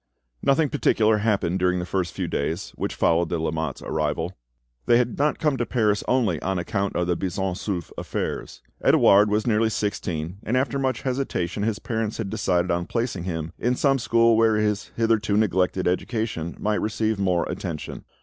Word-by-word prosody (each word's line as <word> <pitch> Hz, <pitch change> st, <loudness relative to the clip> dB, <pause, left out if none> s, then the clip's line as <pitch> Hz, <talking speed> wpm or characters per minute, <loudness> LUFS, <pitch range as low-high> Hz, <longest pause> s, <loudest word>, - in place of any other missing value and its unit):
Nothing 140 Hz, +2 st, +3 dB
particular 110 Hz, -7 st, +3 dB
happened 100 Hz, -4 st, +1 dB
during 90 Hz, 0 st, +2 dB
the 90 Hz, -, -2 dB
first 90 Hz, -1 st, -1 dB
few -, -, -2 dB
days 80 Hz, +5 st, -2 dB
which -, -, -4 dB
followed 85 Hz, 0 st, +2 dB
the 85 Hz, -, -1 dB
Lamottes' 80 Hz, -3 st, -3 dB
arrival. 80 Hz, +3 st, -2 dB, 0.5 s
They 120 Hz, -, +6 dB
had 120 Hz, -1 st, 0 dB
not 150 Hz, +1 st, +2 dB
come 150 Hz, -4 st, +1 dB
to 120 Hz, -, -1 dB
Paris 105 Hz, -4 st, +1 dB
only 110 Hz, -, +1 dB
on 95 Hz, +1 st, -1 dB
account 100 Hz, +3 st, -2 dB
of 90 Hz, -, +1 dB
the 90 Hz, 0 st, +1 dB
Buisson 95 Hz, +1 st, -2 dB
Souef 90 Hz, -2 st, -4 dB
affairs. -, -, -4 dB, 0.2 s
Edouard 100 Hz, +1 st, +6 dB
was 105 Hz, +1 st, +1 dB
nearly 110 Hz, -1 st, +2 dB
sixteen, 90 Hz, -5 st, -3 dB
and 120 Hz, +4 st, 0 dB
after 135 Hz, +1 st, 0 dB
much 130 Hz, -1 st, -1 dB
hesitation 125 Hz, -9 st, -2 dB
his 105 Hz, 0 st, 0 dB
parents 110 Hz, -2 st, -3 dB
had 100 Hz, -4 st, -4 dB
decided 90 Hz, -5 st, +1 dB
on 85 Hz, +1 st, -1 dB
placing 115 Hz, -7 st, -2 dB
him 80 Hz, -2 st, -4 dB
in 125 Hz, +2 st, +1 dB
some 135 Hz, +1 st, +2 dB
school 115 Hz, -1 st, +4 dB
where 110 Hz, -1 st, +4 dB
his 105 Hz, -1 st, 0 dB
hitherto 110 Hz, -3 st, +2 dB
neglected 95 Hz, -3 st, +1 dB
education 90 Hz, -3 st, -2 dB
might 105 Hz, 0 st, 0 dB
receive 110 Hz, 0 st, -1 dB
more 90 Hz, -3 st, +2 dB
attention. 85 Hz, -5 st, -5 dB
105 Hz, 180 wpm, -24 LUFS, 90-115 Hz, 0.5 s, They